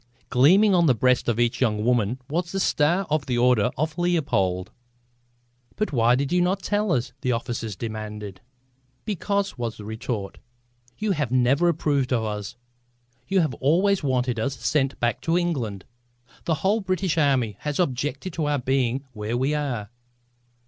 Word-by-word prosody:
Gleaming 190 Hz, +11 st, +5 dB
on 170 Hz, -2 st, +4 dB
the 130 Hz, -, +4 dB
breast 125 Hz, +2 st, +2 dB
of 120 Hz, 0 st, 0 dB
each 120 Hz, +1 st, +1 dB
young 105 Hz, -3 st, +1 dB
woman 120 Hz, 0 st, +1 dB
was 170 Hz, +4 st, -2 dB
the 195 Hz, -, -2 dB
star 175 Hz, +2 st, +2 dB
of 155 Hz, -2 st, 0 dB
the 125 Hz, -2 st, 0 dB
Order 125 Hz, -2 st, +3 dB
of 155 Hz, +3 st, -2 dB
Leopold! 115 Hz, -, 0 dB, 1.0 s
"But 215 Hz, -7 st, -2 dB
why 120 Hz, -1 st, +4 dB
did 135 Hz, +2 st, -1 dB
you 180 Hz, 0 st, +3 dB
not 185 Hz, +2 st, 0 dB
tell 205 Hz, 0 st, 0 dB
us?" 125 Hz, -4 st, 0 dB
the 125 Hz, -, 0 dB
officers 115 Hz, -2 st, -3 dB
demanded. 105 Hz, -3 st, -6 dB, 0.6 s
"Because," 200 Hz, -, -2 dB
was 115 Hz, -2 st, -3 dB
the 105 Hz, -, -9 dB
retort, 110 Hz, -2 st, -5 dB, 0.6 s
"you 215 Hz, -1 st, -1 dB
have 150 Hz, -9 st, -1 dB
never 130 Hz, +7 st, +3 dB
approved 145 Hz, -5 st, 0 dB
of 120 Hz, -3 st, +1 dB
us; 105 Hz, +1 st, -4 dB, 0.7 s
you 190 Hz, -1 st, +3 dB
have 155 Hz, -6 st, 0 dB
always 185 Hz, +8 st, +3 dB
wanted 125 Hz, -3 st, 0 dB
us 135 Hz, +5 st, -2 dB
sent 135 Hz, -2 st, 0 dB
back 120 Hz, 0 st, 0 dB
to 165 Hz, +1 st, +1 dB
England. 125 Hz, -, -2 dB, 0.6 s
The 165 Hz, -, +1 dB
whole 210 Hz, +3 st, +3 dB
British 185 Hz, -3 st, 0 dB
Army 130 Hz, -8 st, +1 dB
has 150 Hz, +1 st, -3 dB
objected 145 Hz, +2 st, -1 dB
to 160 Hz, -2 st, -2 dB
our 145 Hz, -1 st, +1 dB
being 130 Hz, 0 st, 0 dB
where 110 Hz, +2 st, -3 dB
we 135 Hz, +4 st, +1 dB
are." 125 Hz, -8 st, -3 dB
135 Hz, 165 wpm, -24 LUFS, 115-170 Hz, 1.0 s, Gleaming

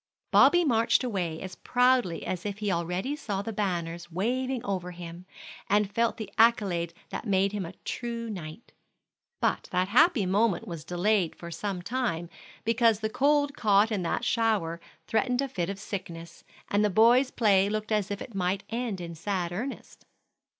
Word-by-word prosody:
Bobby 350 Hz, -1 st, +6 dB
marched 235 Hz, -2 st, +3 dB
away 180 Hz, -9 st, -2 dB
as 190 Hz, -, -7 dB
proudly 245 Hz, -8 st, +2 dB
as 180 Hz, -1 st, -3 dB
if 205 Hz, -1 st, -4 dB
he 210 Hz, -2 st, -1 dB
already 180 Hz, -, -1 dB
saw 200 Hz, -9 st, -3 dB
the 225 Hz, -, -5 dB
banners 175 Hz, -4 st, -3 dB
waving 250 Hz, +7 st, -1 dB
over 185 Hz, -3 st, -2 dB
him, 175 Hz, 0 st, -9 dB, 0.4 s
and 205 Hz, -1 st, +2 dB
felt 230 Hz, +1 st, +1 dB
the 220 Hz, -, -7 dB
accolade 190 Hz, -7 st, +3 dB
that -, -, -5 dB
made 195 Hz, 0 st, +2 dB
him 200 Hz, -4 st, -3 dB
a 170 Hz, -, -9 dB
true 235 Hz, -1 st, -4 dB
knight. 180 Hz, -1 st, -8 dB, 0.7 s
But -, -, 0 dB
that 185 Hz, +1 st, +1 dB
happy 265 Hz, -, +4 dB
moment 200 Hz, +1 st, +1 dB
was 165 Hz, -3 st, -6 dB
delayed 180 Hz, +1 st, +1 dB
for 170 Hz, 0 st, -9 dB
some 180 Hz, +1 st, -4 dB
time, 175 Hz, -8 st, -2 dB, 0.3 s
because 230 Hz, -1 st, +3 dB
the 215 Hz, 0 st, -2 dB
cold 285 Hz, +3 st, +2 dB
caught 210 Hz, -2 st, +3 dB
in 205 Hz, -3 st, 0 dB
that 170 Hz, -, -1 dB
shower 205 Hz, -8 st, +1 dB, 0.2 s
threatened 245 Hz, +3 st, 0 dB
a 275 Hz, -, +1 dB
fit 180 Hz, -8 st, -3 dB
of 195 Hz, -, -4 dB
sickness; 170 Hz, -5 st, -7 dB, 0.2 s
and 205 Hz, +1 st, +2 dB
the 210 Hz, -, +3 dB
boys' 235 Hz, +6 st, +5 dB
play 200 Hz, -5 st, +3 dB
looked 215 Hz, +1 st, -3 dB
as 210 Hz, -2 st, +1 dB
if 205 Hz, 0 st, -4 dB
it 235 Hz, -, -12 dB
might 190 Hz, +1 st, -1 dB
end 230 Hz, -4 st, -2 dB
in 170 Hz, -1 st, -6 dB
sad 175 Hz, +1 st, -2 dB
earnest. 240 Hz, +10 st, -6 dB
205 Hz, 170 wpm, -28 LUFS, 180-230 Hz, 0.7 s, Bobby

